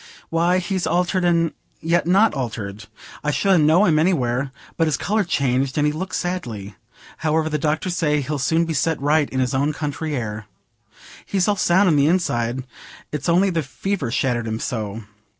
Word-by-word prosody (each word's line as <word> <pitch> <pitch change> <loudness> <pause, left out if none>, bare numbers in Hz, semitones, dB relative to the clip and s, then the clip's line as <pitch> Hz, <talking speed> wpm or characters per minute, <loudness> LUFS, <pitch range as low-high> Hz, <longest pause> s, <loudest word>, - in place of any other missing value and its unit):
"Why, 170 +2 +2
he's 185 -1 -1
altered 180 +2 +1
and 170 -2 +2 0.3
yet 170 +1 +1
not 200 +5 +4
altered. 110 -6 -5 0.4
I 150 - 0
should 190 +4 +3
ha' - - +3
known 165 +7 +5
him 155 -2 +3
anywhere. 135 -6 +1 0.2
But 165 - +1
his 155 - +1
colour's 210 -2 0
changed, 130 -2 0
and 150 - +3
he 150 - +1
looks 185 +5 -3
sadly. 120 - -4 0.4
However, 160 0 0
the 150 -1 -1
doctors 155 +4 -1
say 150 -2 +2
he'll 145 +2 -3
soon 160 +5 +2
be 165 - -3
set 160 +2 0
right 145 +1 +2
in 130 - -2
his 130 0 0
own 140 +3 +1
country 150 +1 -3
air. 110 -4 -4 0.8
He's 190 -3 0
all 205 - +3
sound 190 +1 +3
in 155 -4 +4
th' 140 +2 +4
inside; 125 -8 0 0.5
it's 150 +1 -3
only 185 +3 +3
the 165 -2 0
fever 155 +1 -3
shattered 120 -1 0
him 110 0 -3
so. 110 -3 -4
155 Hz, 185 wpm, -21 LUFS, 130-175 Hz, 0.8 s, known